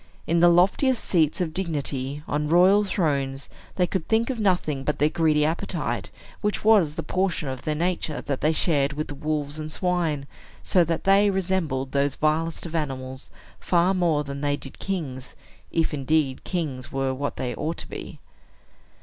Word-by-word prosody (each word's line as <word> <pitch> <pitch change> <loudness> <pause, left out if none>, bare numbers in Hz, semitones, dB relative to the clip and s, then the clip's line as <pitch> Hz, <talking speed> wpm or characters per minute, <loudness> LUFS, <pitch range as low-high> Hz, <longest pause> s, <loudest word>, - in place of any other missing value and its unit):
In 170 +1 +2
the 175 +1 +7
loftiest 195 +9 +3
seats 160 -2 +2
of 160 -3 -2
dignity, 145 -5 -2
on 150 0 -1
royal 185 +5 +6
thrones, 140 -8 -1 0.3
they 180 - +3
could 180 -2 -3
think 230 +3 +2
of 245 - -5
nothing 175 -9 +1
but 150 - -1
their 150 - +3
greedy 155 -2 +2
appetite, 160 +2 -2 0.3
which 210 0 -1
was 195 -9 +5
the - - -3
portion 185 -5 -1
of 130 -1 -4
their 155 - -2
nature 170 -2 -1
that 140 -2 -3
they 155 - +3
shared 150 -3 +1
with 150 0 -4
wolves 150 0 -3
and 155 0 -5
swine; 165 -5 0 0.4
so 180 - +4
that 165 0 -2
they 200 +1 +5
resembled 180 -9 -1
those 140 -1 +1
vilest 160 +2 0
of 170 - -7
animals 130 -4 -4 0.3
far 180 +1 +2
more 170 -5 +1
than 140 -1 -6
they 145 -1 0
did 135 - -9
kings 140 -9 -4 0.3
if, 165 -1 0
indeed, 140 -1 0
kings 150 -8 -3
were 135 -1 -1
what 145 +2 -3
they 125 -1 -3
ought 160 +2 -3
to - - -8
be. - - -8
155 Hz, 175 wpm, -25 LUFS, 140-180 Hz, 0.4 s, the